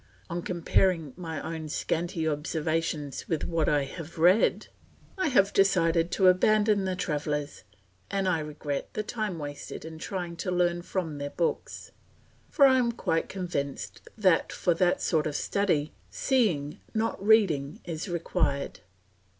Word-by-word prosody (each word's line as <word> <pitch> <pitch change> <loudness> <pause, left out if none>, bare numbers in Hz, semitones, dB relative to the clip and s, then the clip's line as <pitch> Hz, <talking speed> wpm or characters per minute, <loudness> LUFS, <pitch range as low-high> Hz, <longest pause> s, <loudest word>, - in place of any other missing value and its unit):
On 175 +1 -2
comparing 170 -3 +1
my 165 -4 -5
own 160 -1 -5
scanty 165 +2 -1
observations 155 -1 -2
with 160 -3 0
what 165 -2 0
I 145 -1 +2
have 165 +4 -9
read, 180 +6 +4 0.5
I 375 -3 0
have 200 -8 +3
decided 170 -3 +3
to 190 - +4
abandon 210 +2 +4
the 185 -1 -1
travellers 150 -4 -3 0.5
and 195 -1 0
I 175 -3 +2
regret 150 -2 -5
the 215 - -1
time 215 -5 -3
wasted 145 0 -7
in 160 0 -8
trying 175 -1 -4
to 180 - -3
learn 175 -1 +1
from 170 -5 -3
their 145 0 -3
books; 170 +3 -3 0.6
for 280 - +5
I 260 -1 +6
am 240 -2 +2
quite 165 -8 -1
convinced 170 -7 -4 0.2
that 185 -6 +3
for 175 - +1
that 175 +1 +1
sort 155 -2 +1
of 150 - -4
study, 160 -7 0 0.2
seeing 195 - 0 0.2
not 220 -2 -1
reading 185 -10 +3
is 165 +2 -4
required. 165 -4 -1
170 Hz, 145 wpm, -28 LUFS, 155-190 Hz, 0.6 s, I